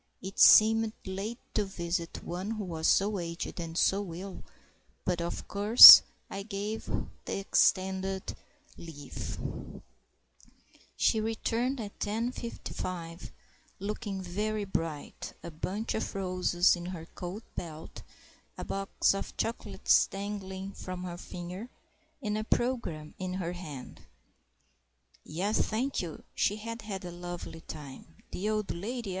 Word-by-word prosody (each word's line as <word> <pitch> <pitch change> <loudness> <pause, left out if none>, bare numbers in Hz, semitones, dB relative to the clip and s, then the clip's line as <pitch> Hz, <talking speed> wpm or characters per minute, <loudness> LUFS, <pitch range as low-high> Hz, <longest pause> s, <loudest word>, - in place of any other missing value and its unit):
It 190 +1 -7
seemed 220 0 +7
late 195 +5 -4 0.2
to 210 - +2
visit 170 -3 -4
one 180 +4 -4
who 220 -2 -3
was 165 -3 -2
so 200 0 +3
aged 170 +1 -5
and 165 -1 -5
so 195 -3 +1
ill, 190 +2 -8 0.6
but, 175 -2 0
of 170 - -4
course, 210 +4 +12 0.3
I 195 - -5
gave 210 +1 -5 0.4
the - - -3
extended 190 -1 +1 0.4
leave. 145 -4 -7 1.6
She 220 - +3
returned 230 +4 -1
at 205 -3 -7
10.55, 205 -6 -4 0.5
looking 200 -1 -4
very 210 +4 -2
bright, 165 -6 -4
a 170 - -7
bunch 195 +8 -3
of 220 - -3
roses 185 -2 +2
in 175 0 -7
her 175 -3 -6
coat 180 +6 -7
belt, 160 -2 -7 0.6
a - - -5
box 195 0 +1
of 195 - -6
chocolates 230 - +2
dangling 195 -1 -5
from 185 -2 -7
her 175 -1 -5
finger, 180 +6 -7 0.5
and 210 0 -1
a - - -2
programme 220 -11 -1
in 185 -1 -3
her 180 -2 -3
hand. 150 -8 -9 1.2
Yes, 195 +7 0
thank 250 +5 -1
you; 170 -4 -7
she 205 - +1
had 230 +2 -6
had 195 -3 -6
a 175 - -6
lovely 175 -1 -7
time. 150 +1 -10
The 205 +4 -2
old 215 -2 -1
lady? 225 +5 -4
190 Hz, 125 wpm, -30 LUFS, 175-215 Hz, 1.6 s, course